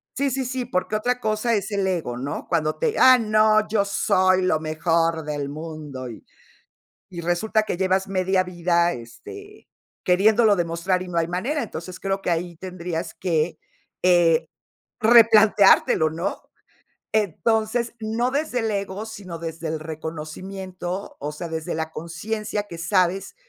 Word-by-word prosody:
sí, 280 +1 +1
sí, 265 0 -2
sí, 250 0 -3
porque 215 -2 -2
otra 245 +4 0
cosa 220 +1 0
es 205 +1 -2
el 200 -2 0
ego, 170 -10 -2
¿no? 135 +4 -5
Cuando 155 -2 0
te: 465 -2 0
"Ah, 255 0 +8
no, 215 -1 +3
yo 210 -1 +2
soy 185 -1 +2
lo 180 -4 +2
mejor 165 +1 0
del 145 -2 -3
mundo 150 -4 -7
y". 115 - -10 0.9
Y 170 -2 -6
resulta 175 +6 +1
que 200 - -3
llevas 190 +1 +1
media 190 0 +1
vida, 175 -1 +1
este, 405 - -11 0.4
queriéndolo 210 +4 +4
demostrar 175 +1 -1
y - - -9
no 170 -1 -1
hay 165 - 0
manera. 230 - -2
Entonces, 185 -4 -7
creo 195 0 -1
que 175 - 0
ahí 170 +1 -2
tendrías 175 -2 -5
que, 165 -3 -1 0.4
eh, 170 -3 +4 0.5
replanteártelo, 215 -7 +6
¿no? 165 +3 -3 0.7
Entonces, 220 +4 0
no 225 +3 -1
desde 280 -2 -1
el 225 - -1
ego, 200 +1 -3
sino 190 -6 -8
desde 165 0 -5
el 160 0 -3
reconocimiento. 175 +4 -6
O 150 +1 -4
sea, 170 +3 -6
desde 160 -1 -4
la 160 0 -3
conciencia, 205 +6 -4
que 170 - -8
sabes 185 - 0
185 Hz, 150 wpm, -23 LUFS, 165-215 Hz, 0.9 s, Ah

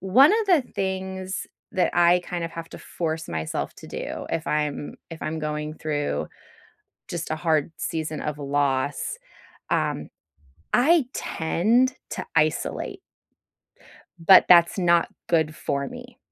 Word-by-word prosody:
one 255 - +6
of 425 - -3
the 345 -8 +5
things 190 0 -3 0.3
that 185 -4 +2
I 175 +1 +5
kind 175 -1 -3
of 165 - -4
have 165 0 -7
to - - -9
force 160 -2 -4
myself 80 -1 -3
to - - -11
do - - -5
if 165 - -2
I'm 150 -1 -1 0.2
if 165 - -8
I'm 160 +1 -3
going 150 0 -3
through 150 -2 -2 0.8
just 165 -3 -4
a - - +1
hard 160 -1 +1
season 155 -1 -3
of 150 -1 -3
loss, 140 -1 0 0.5
um, - - 0 0.6
I 300 +3 +5
tend 230 +11 +1 0.2
to - - -4
isolate 155 -1 0 1.2
but 180 +3 +7
that's 170 +2 +6
not 170 -2 +3 0.2
good 160 -2 +1
for 140 -1 -2
me. 245 0 -10
165 Hz, 135 wpm, -25 LUFS, 150-190 Hz, 1.2 s, but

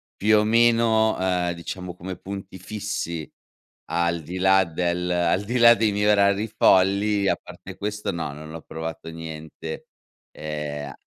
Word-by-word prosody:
più 105 +1 +3
o 105 - +3
meno, 115 -1 +3
ehm, 90 -2 0
diciamo, 90 +1 -7
come 90 0 -7
punti 95 -1 -8
fissi, 95 -5 -4 0.6
al 85 -1 0
di 90 +4 -7
là 95 +1 +5
del 90 +2 -2
al 90 +2 +1
di 120 +4 -1
là 120 0 +8
dei 110 -2 +1
miei 105 +1 0
orari 100 +1 +3
folli, 100 0 +3
a 90 - +3
parte - - -12
questo 105 0 -3
no, 85 -4 -4
non 75 +2 -10
ho 80 - -7
provato 80 0 -7
niente, 80 -1 -8 0.4
ehm 75 -2 -5
95 Hz, 150 wpm, -24 LUFS, 85-105 Hz, 0.6 s, là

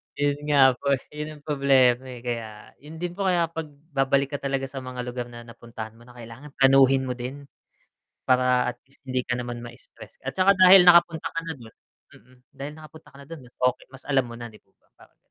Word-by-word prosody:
Ayun 145 0 0
nga 135 -3 +6
po, 140 -1 +1
eh, 130 - -10
'yon 150 +1 -6
ang - - -29
problema, 130 -3 +2
eh, 125 -1 -10
kaya 115 -3 -6
'yon 150 +3 -12
din 175 +1 -4
po, 195 +2 -3
kaya 170 -2 +1
'pag 165 -2 -5 0.2
babalik 140 0 +1
ka 145 - -4
talaga 135 -1 -2
sa 135 0 -6
mga 125 -1 -6
lugar 125 0 -5
na 120 0 -11
napuntahan 115 -1 -10
mo 115 +2 -19
na, 125 - -16
kailangan 120 +5 -12
planuhin 135 0 +5
mo 130 - -3
din. 130 +3 -7 0.8
Para 125 -1 +2
at - - -39
least 140 0 -16
hindi 130 0 -1
ka 125 - -3
naman 120 -1 -5
mastress 120 -1 -13
at - - -3
'tsaka 190 +1 +4
dahil 185 0 +9
nakapunta 170 -2 +5
ka 165 - -3
na 165 - -3
doon 115 -4 -15 0.4
mm, 125 +4 -21 0.2
dahil 140 +2 -6
nakapunta 155 0 -14
ka 140 - -14
na 140 - -16
doon, 165 -3 -9
mas 120 - -21
okey, 125 0 0
mas 135 - -13
alam 135 -2 +2
mo 120 - -10
na, 120 0 -8
'di 105 - -16
po - - -38
ba, - - -36
parang - - -21
135 Hz, 225 wpm, -24 LUFS, 125-150 Hz, 0.8 s, dahil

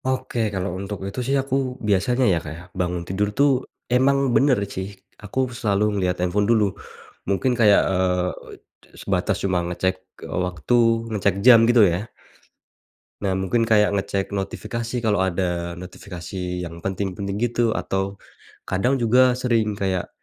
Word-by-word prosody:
Oke, 130 -2 -2
kalau 95 -2 -3
untuk 100 +1 -5
itu 100 +5 -5
sih 135 +3 0
aku 135 0 -2 0.3
biasanya 120 +6 +2
ya, - - +1
Kak, 75 - -6
ya, 85 - -11 0.2
bangun 90 -1 -1
tidur 100 +2 0
tuh 145 +1 +5 0.4
emang 135 +2 +4 0.2
bener 135 -3 +4 0.2
sih, 95 0 -3 0.4
aku 105 +5 -4
selalu 105 -4 0
ngelihat 90 -3 0
handphone 100 +4 0
dulu 105 -4 +3 0.6
mungkin 100 +7 +1
kayak, 105 -3 +6
eee, 90 -1 +1 0.7
sebatas 95 +1 0
cuma 90 -2 +1
ngecek, 95 +1 0 0.3
eee, - - -3
waktu, 90 +5 -3 0.4
ngecek 100 -2 +1
jam, 125 -3 +9
gitu, 120 -1 +6
ya. 95 +5 -1 1.1
Nah, 95 -2 0
mungkin 95 +5 0
kayak 105 -2 +4
ngecek 100 0 -2
notifikasi, 115 +4 -4
kalau 105 -3 +2
ada 90 -2 -1
notifikasi 90 0 -6
yang 85 0 -9
penting-penting 100 +1 -3
gitu, 120 +1 +1
atau 95 -2 -2 0.5
kadang 125 +9 +1
juga 125 +1 +4
sering 115 -5 0
kayak 95 -3 -1
100 Hz, 145 wpm, -23 LUFS, 90-115 Hz, 1.1 s, jam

